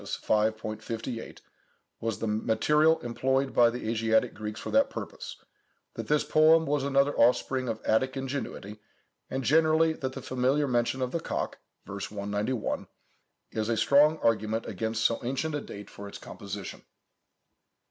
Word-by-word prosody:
5, 110 0 +1 0.2
58, 115 +1 -6 0.6
was 115 -1 -2
the - - -3
material 150 +9 +3
employed 130 +3 0
by 120 -1 +6
the 120 -1 -5
Asiatic 110 0 +2
Greeks 105 0 -6
for - - -6
that 275 0 +4
purpose, - - -7 0.6
that - - -6
this 150 0 +2
poem 160 +1 +5
was 145 -2 0
another 140 +1 +2
offspring 125 +1 +2
of 110 - -3
Attic 130 +5 +1
ingenuity; 130 -6 -5 0.5
and 130 0 -3
generally 160 +3 +4
that 130 -4 -4
the 135 - -7
familiar 130 +3 +1
mention 125 +1 0
of 125 - -2
the 170 - -1
cock - - -3 0.3
(v. - - -10
191) 105 +3 -3 0.6
is 110 0 -2
a 115 - +1
strong 145 +7 +5
argument 110 0 +1
against 110 0 -2
so 115 - +2
ancient 135 +6 -2
a 145 - -2
date 100 0 -9
for 100 - -10
its 100 - -8
composition." - - -8
125 Hz, 150 wpm, -28 LUFS, 110-140 Hz, 0.6 s, by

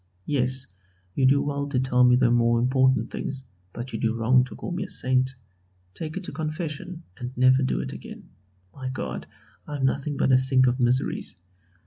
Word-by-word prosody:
Yes, 130 -2 0 0.5
you 130 +3 +3
do 140 +1 +4
well 140 0 -2
to 135 -3 0
tell 125 -1 +3
me 125 0 +6
the 125 -1 +3
more 120 0 +3
important 130 -1 +2
things, 135 -1 -4 0.3
but 120 +5 -7
you - - -3
do 115 0 0
wrong 125 +3 +4
to 125 - -10
call - - -6
me 180 +2 -2
a 190 - -8
Saint. 130 +1 +1 0.6
Take 160 - -6
it 190 - -5
to - - -5
confession, 155 +2 -5 0.2
and 125 +1 -6
never 130 +1 +5
do 130 - 0
it 65 - -5
again. - - -10 0.4
My 130 -1 -5
God! 70 - -5 0.4
I 150 - -5
am 135 -2 0
nothing 140 +2 -1
but 135 - +2
a 130 - +6
sink 130 0 +4
of 125 +1 +1
miseries. 125 +2 +1
130 Hz, 195 wpm, -25 LUFS, 125-140 Hz, 0.6 s, me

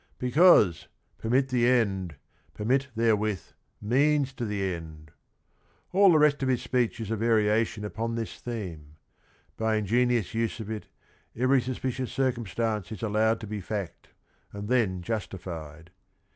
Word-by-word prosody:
"Becaus 125 - +5
e, - - -28 0.3
permit 130 +4 +1
the 120 -2 +2
end 100 -9 +1 0.2
— - - -37
per 105 - -5
mit 135 +4 +2
therewith, 110 -4 0 0.3
means 140 +5 +2
jo 120 -3 -4
the 105 -2 -3
endj 80 -3 -8 0.4
" - - -39
All 195 0 +6
the 160 - +5
rest 150 -2 +3
of 135 - 0
^his 125 -2 0
speech 125 -3 0
is 110 -1 -5
a - - +1
variation 110 -1 +1
upon 115 +2 -3
this 115 -2 -5
theme. 85 -11 -7 0.6
By 110 0 +1
ingenious 115 0 +1
use 115 0 -1
of 110 -1 -6
it 110 -1 -6 0.5
every 130 +2 +3
suspicious 130 0 -3
circumstance 115 -6 -1
is 110 -2 -7
allowed 110 +1 +2
to - - -5
be 105 0 -4
fact, 100 -2 -5 0.4
and 100 +1 -7
then 105 -8 +1
justified. 85 -6 -6
110 Hz, 155 wpm, -27 LUFS, 100-125 Hz, 0.6 s, All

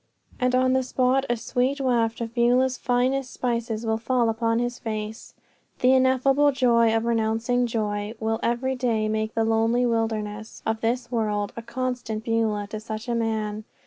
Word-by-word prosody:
and 250 0 +2
on 255 0 +3
the 260 - +3
spot 260 +1 +1
a 240 - +1
sweet 255 +4 -1
waft 235 -3 +1
of 230 0 -4
Beulah's 250 +2 +3
finest 255 +2 0
spices 235 -2 -2
will 220 0 0
fall 240 0 +1
upon 230 0 0
his 245 0 -2
face. 215 -1 -5 0.4
"The 255 0 +4
ineffable 265 +2 +4
joy 235 -4 +3
of 225 - -2
renouncing 235 +2 +1
joy" 210 -1 -2
will 225 0 -1
every 255 +3 0
day 230 -4 0
make 220 0 -2
the 225 -1 +2
lonely 225 +2 +2
wilderness 220 -2 -2
of 220 0 -1
this 240 +2 -1
world 210 -3 -1
a 230 - -5
constant 235 -2 -3
Beulah 225 -3 0
to 215 - -4
such 220 +1 -6
a 240 - -1
man. 220 -2 -2
230 Hz, 170 wpm, -25 LUFS, 220-250 Hz, 0.4 s, The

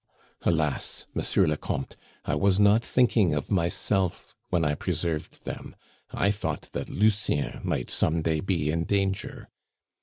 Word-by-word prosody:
Alas! 80 -4 0
Monsieur - - +2
le 75 - +1
Comte, 70 - -4 0.3
I - - 0
was 95 +6 +3
not 105 +3 +5
thinking 110 -11 +3
of 75 - -3
myself 95 0 0 0.2
when 85 -3 +1
I 75 - +2
preserved 80 -1 -3
them; - - -6 0.3
I 100 - +1
thought 105 - -4
that - - -4
Lucien 105 -8 +1
might 60 - -2
some 80 0 +1
day 80 -1 +1
be 80 -5 0
in 80 +1 -1
danger! 95 -1 -1
85 Hz, 145 wpm, -27 LUFS, 75-100 Hz, 0.3 s, not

